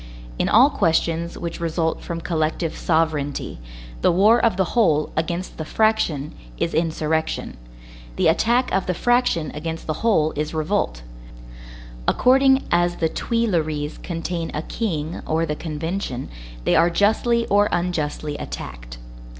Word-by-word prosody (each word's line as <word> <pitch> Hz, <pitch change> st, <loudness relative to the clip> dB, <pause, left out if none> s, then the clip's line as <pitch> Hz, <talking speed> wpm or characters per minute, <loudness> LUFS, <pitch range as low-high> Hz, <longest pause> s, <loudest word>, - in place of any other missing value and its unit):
In -, -, +1 dB
all 255 Hz, +7 st, +6 dB
questions 170 Hz, -3 st, 0 dB
which 170 Hz, -1 st, -5 dB
result 165 Hz, -1 st, -1 dB
from 170 Hz, 0 st, -5 dB
collective 160 Hz, 0 st, -1 dB
sovereignty, 155 Hz, -, -1 dB, 0.4 s
the -, -, +4 dB
war 210 Hz, +7 st, +4 dB
of 225 Hz, -5 st, +3 dB
the 190 Hz, -3 st, 0 dB
whole 160 Hz, -11 st, +2 dB
against 170 Hz, +3 st, -3 dB
the -, -, -2 dB
fraction 170 Hz, -7 st, +1 dB, 0.2 s
is 165 Hz, -, -1 dB
insurrection; 160 Hz, -1 st, -1 dB, 0.6 s
the -, -, +2 dB
attack 235 Hz, +10 st, +2 dB
of 190 Hz, 0 st, 0 dB
the 180 Hz, -, 0 dB
fraction 240 Hz, -9 st, +1 dB
against 160 Hz, +2 st, -5 dB
the 155 Hz, -, -1 dB
whole 160 Hz, -9 st, +3 dB
is 150 Hz, +2 st, -3 dB
revolt; 155 Hz, -, -1 dB, 1.0 s
according 265 Hz, +1 st, +4 dB
as 175 Hz, 0 st, +2 dB
the 160 Hz, -, 0 dB
Tuileries 160 Hz, -12 st, -1 dB
contain 170 Hz, -1 st, -4 dB
a 150 Hz, -, -2 dB
king 165 Hz, -8 st, -3 dB
or 160 Hz, +1 st, +1 dB
the 150 Hz, -1 st, -2 dB
Convention, 160 Hz, -3 st, -4 dB, 0.3 s
they -, -, +2 dB
are 170 Hz, +2 st, +5 dB
justly 220 Hz, +5 st, +2 dB
or 205 Hz, 0 st, +3 dB
unjustly 155 Hz, -4 st, -2 dB
attacked. -, -, -7 dB
165 Hz, 135 wpm, -22 LUFS, 155-200 Hz, 1.0 s, all